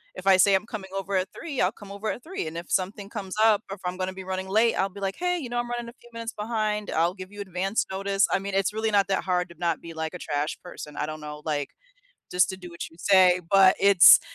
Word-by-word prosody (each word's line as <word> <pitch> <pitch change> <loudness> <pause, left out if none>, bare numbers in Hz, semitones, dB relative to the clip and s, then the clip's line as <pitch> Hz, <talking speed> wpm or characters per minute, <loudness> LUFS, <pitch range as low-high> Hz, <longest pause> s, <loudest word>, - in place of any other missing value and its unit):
If 185 - -9
I 195 -1 +6
say 195 +1 +5
I'm 190 - 0
coming 210 -4 -7
over 195 0 -3
at 185 - 0
3, 295 -6 -5
I'll 180 - +3
come 205 -3 -12
over 200 +2 -4
at 245 - -4
3, 355 - -4
and 160 +1 -6
if 170 - -8
something 195 +2 -1
comes 195 -4 -6
up 220 -1 +4
or 195 - -4
if 195 - -21
I'm 180 0 -2
gonna 185 0 -2
be 190 0 -8
running 190 0 -4
late, 220 +4 +3
I'll 195 - +2
be 200 +1 -11
like, 195 -1 -2
"Hey, 360 0 +1
you 255 -6 -6
know, 240 - -1
I'm 240 0 -3
running 240 -1 -4
a 235 - -13
few 240 - -18
minutes 230 0 -5
behind," 210 -1 -1
I'll 170 +2 +1
give 185 +1 -10
you 205 - -7
advanced 190 +2 -1
notice, 195 +1 +1
I - - +2
mean, 200 +1 -5
it's 195 0 +1
really 220 0 -1
not 200 -2 +3
that 195 - 0
hard 180 -1 0
to 170 - -13
not 170 -2 -1
be 165 -1 -9
like 160 +1 -4
a 180 - -7
trash 145 0 -2
person, 150 -4 -9
I - - -1
don't 155 0 -6
know, 150 0 -7
like, 145 -3 -1 0.6
just 180 +2 +3
to 190 - -7
do 180 -1 -9
what 170 0 -7
you 165 - -19
say, 185 -1 +5
but, 195 -1 +7
it's 200 -2 +8
195 Hz, 285 wpm, -26 LUFS, 180-210 Hz, 0.6 s, it's